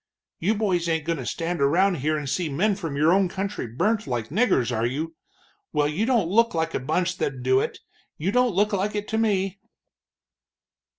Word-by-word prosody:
"You 205 +7 +1
boys 185 -5 0
ain't 160 -2 0
goin' 165 -2 -1
to 125 - -5
stand 170 -1 -2
around 175 +6 +3
here 155 +3 0
and 145 -2 -4
see 165 +4 -1
men 190 +10 +1
from 165 -7 -5
your 155 +4 +4
own 190 -1 +3
country 195 -5 -4
burnt 200 - 0
like 120 -4 -2
niggers, 150 - +2
are 115 +1 +1
you? 155 +6 -4 0.6
Well, 145 -1 +2
you 175 +10 -1
don't 235 -9 +2
look 230 +3 +3
like 160 0 -1
a - - 0
bunch 175 +7 -1
that'd 130 -2 -2
do 130 +1 +4
it - - -2 0.4
you 175 +6 -1
don't 250 -3 +2
look 205 +2 +2
like 200 +2 -1
it 210 0 -3
to 220 - 0
me." 195 -3 0
175 Hz, 200 wpm, -25 LUFS, 150-200 Hz, 0.6 s, your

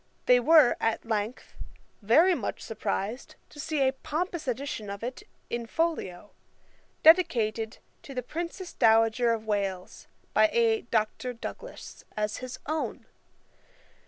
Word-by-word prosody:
They 250 0 +6
were, 300 0 +6
at 225 +1 -1
length, 220 +1 -3 0.5
very 315 - +5
much 245 -11 -3
surprised 215 +2 -4
to 295 - -14
see 290 -2 +1
a 260 - +1
pompous 320 +3 -4
edition 250 -4 -3
of 200 +2 -6
it 250 +2 -5 0.3
in 235 -1 -4
folio, 225 - -2 0.7
dedicated 235 - +4 0.2
to 275 - -10
the 250 - -2
Princess 340 - -6
Dowager 225 +2 +4
of 225 -1 -2
Wales, 195 -3 -3 0.3
by 215 0 +5
a 230 -1 +3
Dr. 225 +3 -1
Douglas, 230 - -9
as 210 0 -1
his 255 0 -7
own. 310 +1 -3
235 Hz, 130 wpm, -28 LUFS, 215-295 Hz, 0.7 s, They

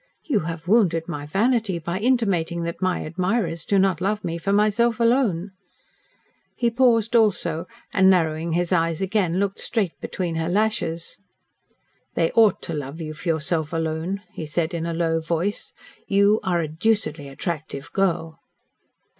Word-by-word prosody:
"You 270 - +1
have 165 +1 -5
wounded 175 -6 +3
my 145 -4 -5
vanity 215 - +1
by 170 +3 -3
intimating 195 -8 +1
that 170 +2 -5
my 185 -1 0
admirers 175 0 -1
do 200 - +3
not 190 -3 +2
love 205 +3 -1
me 170 0 -3
for 195 +4 -1
myself 215 +3 +2
alone." 230 -7 +2 1.0
He 235 -1 +1
paused, 230 -2 +3
also, 185 -7 +2 0.3
and, 190 -1 +5
narrowing 165 -2 +2
his 175 +1 0
eyes 165 -2 +1
again, 190 -3 0
looked 200 0 -1
straight 205 -8 -1
between 170 -3 -3
her 165 +1 -1
lashes. 190 -5 -1 1.0
"They 165 -1 +2
ought 220 -4 +4
to 165 - -4
love 145 +1 -5
you 155 -1 -5
for 170 +3 -5
yourself 160 0 0
alone," 165 +4 -2
he 155 - -6
said, 160 +3 -1
in 165 0 -2
a 170 - -2
low 165 -1 +1
voice. 170 +5 -2 0.4
"You 200 +2 +4
are 180 -4 0
a 160 - -2
deucedly 160 -3 0
attractive 145 -1 -5
girl." 170 -4 0
175 Hz, 155 wpm, -23 LUFS, 165-205 Hz, 1.0 s, and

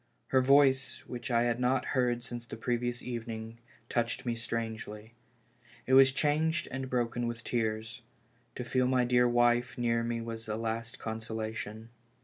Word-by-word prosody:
Her 130 - +4
voice, 135 0 +4
which 120 0 -6
I 120 -1 +3
had 120 0 0
not 125 +1 +2
heard 120 -2 +1
since 120 -1 -6
the - - -7
previous 120 +1 -1
evening, 115 -1 -5 0.3
touched 120 +2 -1
me 120 - 0
strangely. 115 -1 -5 0.7
It 130 - 0
was 135 0 +8
changed 155 +4 +1
and 135 0 -4
broken 120 -1 0
with 115 0 -5
tears. 110 +1 -2 0.5
To 125 - -4
feel 125 +1 +1
my 125 -1 +3
dear 125 0 +4
wife 120 0 +3
near 115 -1 +1
me 115 0 -2
was 115 -1 -6
a 105 - -2
last 115 +1 -3
consolation. 110 0 -5
120 Hz, 155 wpm, -31 LUFS, 115-125 Hz, 0.7 s, was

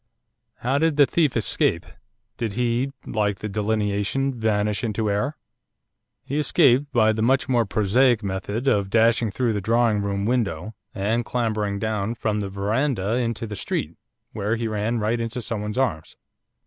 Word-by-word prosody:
How 135 +4 +1
did 160 -1 +1
the 145 - +7
thief 150 -4 +1
escape, 110 - +1 0.5
did 115 -3 -3
he, 120 +3 0
like 105 -2 -1
the 105 - -5
delineation, 105 +5 -1
vanish 105 -2 0
into 110 -2 -1
air?' 130 +10 -1 0.9
'He 145 +3 -2
escaped 145 -3 +3
by 110 -4 +4
the 110 - -2
much 130 +3 +2
more 120 -4 +2
prosaic 110 +3 +2
method 100 +6 -3
of 100 -6 +2
dashing 115 +1 +3
through 115 +3 0
the 105 - -2
drawing 115 0 +2
room 100 0 -2
window, 110 -5 -1 0.2
and 110 +4 0
clambering 110 -4 -1
down 110 +1 -2
from 105 -2 -1
the 100 -1 -3
verandah 105 +2 -1
into 115 -2 -2
the 105 -2 -6
street, 80 -4 -3 0.4
where 105 +2 -1
he 115 0 -2
ran 110 +2 -1
right 110 +2 0
into 115 +2 -3
someone's 105 -1 -4
arms. 95 -13 -1
110 Hz, 160 wpm, -23 LUFS, 105-120 Hz, 0.9 s, the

